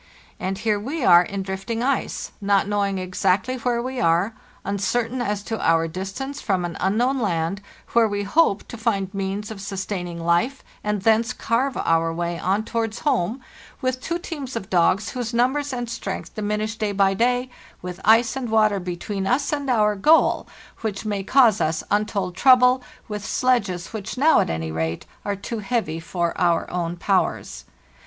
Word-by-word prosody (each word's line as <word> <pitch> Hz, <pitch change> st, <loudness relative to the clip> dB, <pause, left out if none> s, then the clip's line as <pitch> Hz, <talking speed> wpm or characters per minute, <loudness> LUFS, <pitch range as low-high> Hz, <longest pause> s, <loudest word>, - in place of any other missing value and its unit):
And 190 Hz, +1 st, -2 dB
here 210 Hz, -1 st, 0 dB
we 270 Hz, +5 st, -3 dB
are 175 Hz, -1 st, +8 dB
in 195 Hz, +2 st, -4 dB
drifting 195 Hz, +5 st, -3 dB
ice, 270 Hz, +1 st, -1 dB
not 200 Hz, -1 st, +2 dB
knowing 200 Hz, -1 st, 0 dB
exactly 185 Hz, +6 st, 0 dB
where 240 Hz, -1 st, -1 dB
we 260 Hz, 0 st, -4 dB
are, 170 Hz, +6 st, +2 dB, 0.3 s
uncertain 225 Hz, +5 st, -1 dB
as 210 Hz, -3 st, -2 dB
to 225 Hz, +1 st, -4 dB
our 165 Hz, 0 st, +3 dB
distance 195 Hz, -, -5 dB
from 185 Hz, -4 st, 0 dB
an 170 Hz, -, -5 dB
unknown 240 Hz, +8 st, +1 dB
land, 180 Hz, -2 st, -1 dB, 0.3 s
where 235 Hz, -1 st, +5 dB
we 205 Hz, -1 st, -2 dB
hope 200 Hz, -1 st, +2 dB
to 235 Hz, -, -7 dB
find 200 Hz, -4 st, -1 dB
means 195 Hz, +2 st, -3 dB
of 205 Hz, -3 st, -7 dB
sustaining 190 Hz, -3 st, -4 dB
life 170 Hz, +11 st, +1 dB, 0.2 s
and 210 Hz, -2 st, -1 dB
thence 225 Hz, +2 st, +3 dB
carve 250 Hz, +3 st, 0 dB
our 165 Hz, 0 st, +2 dB
way 170 Hz, +1 st, -3 dB
on 195 Hz, +4 st, 0 dB
towards 225 Hz, -1 st, -2 dB
home, 250 Hz, -, 0 dB, 0.4 s
with 255 Hz, 0 st, -1 dB
two 335 Hz, +5 st, -2 dB
teams 290 Hz, -7 st, -6 dB
of 210 Hz, -4 st, -5 dB
dogs 185 Hz, +4 st, +3 dB
whose 240 Hz, -2 st, -4 dB
numbers 270 Hz, +4 st, +1 dB
and 245 Hz, -2 st, -3 dB
strength 235 Hz, -, -5 dB
diminish 215 Hz, +1 st, -2 dB
day 210 Hz, -2 st, -1 dB
by 195 Hz, -1 st, +3 dB
day, 245 Hz, +4 st, +1 dB, 0.3 s
with 180 Hz, +1 st, -6 dB
ice 230 Hz, +2 st, +5 dB
and 260 Hz, -3 st, -3 dB
water 215 Hz, -2 st, +3 dB
between 190 Hz, +2 st, -4 dB
us 275 Hz, +6 st, +1 dB
and 285 Hz, -2 st, -2 dB
our 210 Hz, -4 st, +3 dB
goal 305 Hz, +12 st, +4 dB, 0.3 s
which 215 Hz, -2 st, -4 dB
may 205 Hz, -2 st, -1 dB
cause 225 Hz, 0 st, +4 dB
us 155 Hz, 0 st, 0 dB
untold 200 Hz, -3 st, 0 dB
trouble, 255 Hz, +2 st, +5 dB, 0.3 s
with 210 Hz, -2 st, -5 dB
sledges 205 Hz, -9 st, 0 dB
which 215 Hz, +2 st, -5 dB
now, 310 Hz, +5 st, +5 dB
at -, -, +1 dB
any 80 Hz, 0 st, -3 dB
rate, 80 Hz, +1 st, -2 dB, 0.2 s
are 205 Hz, -1 st, -1 dB
too 210 Hz, +3 st, -5 dB
heavy 210 Hz, -7 st, -1 dB
for 170 Hz, +1 st, -2 dB
our 170 Hz, -2 st, +2 dB
own 175 Hz, -1 st, -2 dB
powers. 120 Hz, -, -1 dB
205 Hz, 175 wpm, -23 LUFS, 185-240 Hz, 0.4 s, are